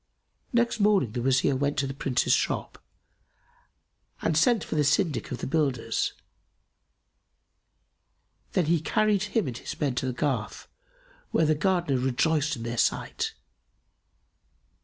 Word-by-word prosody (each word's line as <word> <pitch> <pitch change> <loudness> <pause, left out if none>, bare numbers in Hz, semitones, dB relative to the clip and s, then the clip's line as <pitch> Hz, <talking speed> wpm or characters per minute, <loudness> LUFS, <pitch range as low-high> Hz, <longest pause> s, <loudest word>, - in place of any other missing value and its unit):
Next 235 -2 +1
morning 200 - +3
the 120 - -3
Wazir 135 +2 +2
went 140 +2 -1
to 140 - +1
the 135 - -4
Prince's 135 -2 +1
shop - - -1 1.4
and 160 - +1
sent 220 +8 +3
for - - -6
the 150 -1 +2
syndic 145 +1 +1
of 125 - -3
the - - -5
builders; 135 -6 0 2.4
then 180 - +2
he 165 0 +2
carried 210 +3 +2
him 215 +1 0
and 125 - -4
his - - -7
men 140 -4 0
to 130 - -2
the 130 - -2
garth, 125 -4 -2 0.6
where 160 - +2
the 155 - +3
Gardener 165 -4 +1
rejoiced 150 +4 +1
in 115 - -7
their 120 0 -3
sight. - - -1
145 Hz, 140 wpm, -27 LUFS, 130-175 Hz, 2.4 s, morning